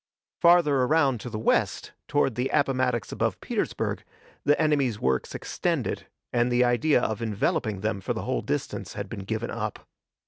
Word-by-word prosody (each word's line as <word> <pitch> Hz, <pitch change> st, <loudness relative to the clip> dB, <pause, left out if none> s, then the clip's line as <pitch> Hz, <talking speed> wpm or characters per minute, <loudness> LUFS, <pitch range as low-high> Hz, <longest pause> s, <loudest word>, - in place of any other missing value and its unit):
Farther 170 Hz, -5 st, +5 dB
around 135 Hz, -1 st, +3 dB
to 125 Hz, -, -6 dB
the 110 Hz, -, -4 dB
west, 110 Hz, -, +1 dB, 0.2 s
toward 145 Hz, -3 st, +2 dB
the 125 Hz, +4 st, -1 dB
Appomattox 130 Hz, -5 st, +1 dB
above -, -, -1 dB
Petersburg, -, -, -2 dB, 0.4 s
the 145 Hz, 0 st, +3 dB
enemy's 140 Hz, -8 st, +2 dB
works 65 Hz, -1 st, 0 dB
extended, -, -, -2 dB, 0.3 s
and 120 Hz, 0 st, +2 dB
the 120 Hz, +1 st, +4 dB
idea 125 Hz, +4 st, +3 dB
of 110 Hz, 0 st, -1 dB
enveloping 110 Hz, -1 st, -1 dB
them 105 Hz, -1 st, -1 dB
for -, -, -2 dB
the -, -, -4 dB
whole -, -, -1 dB
distance -, -, -3 dB
had 100 Hz, -1 st, -4 dB
been 100 Hz, -3 st, -6 dB
given 110 Hz, +2 st, -3 dB
up. 110 Hz, -2 st, -4 dB
120 Hz, 165 wpm, -26 LUFS, 110-140 Hz, 0.4 s, Farther